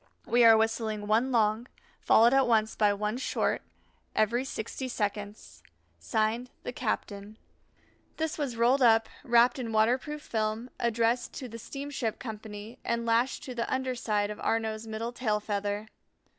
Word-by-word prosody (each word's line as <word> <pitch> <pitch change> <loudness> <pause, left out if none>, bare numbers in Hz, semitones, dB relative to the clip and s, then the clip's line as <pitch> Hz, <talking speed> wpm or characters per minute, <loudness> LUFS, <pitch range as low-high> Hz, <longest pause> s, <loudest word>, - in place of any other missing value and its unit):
We 240 +1 +4
are 225 -1 +8
whistling 220 -1 -1
one 225 +5 +2
long, 225 0 +2 0.3
followed 235 +3 +5
at 270 -1 +4
once 220 -2 +2
by 210 -1 +3
one 210 +3 -2
short, - - 0 0.5
every 235 +4 +2
sixty 260 +1 -5
seconds. 210 -3 -4 0.4
(Signed) 225 +2 -1
THE - - -5
CAPTAIN. 215 -3 -4 0.8
This 320 -1 -1
was 275 -6 -3
rolled 245 +4 +3
up, 225 -2 +5 0.2
wrapped 240 0 +4
in 235 -3 -4
waterproof 255 +7 +1
film, 220 +2 -2
addressed 235 +1 +1
to 260 - -6
the 230 0 -9
Steamship 275 -3 -4
Company, 215 -1 -8
and 235 0 -1
lashed 235 +3 +1
to 265 -4 -6
the 235 -1 -3
under 260 0 0
side 210 -4 -1
of 210 - -8
Arnaux's 220 0 -1
middle 220 +2 -4
tail 220 -4 0
feather. 205 0 -2
230 Hz, 150 wpm, -29 LUFS, 215-245 Hz, 0.8 s, are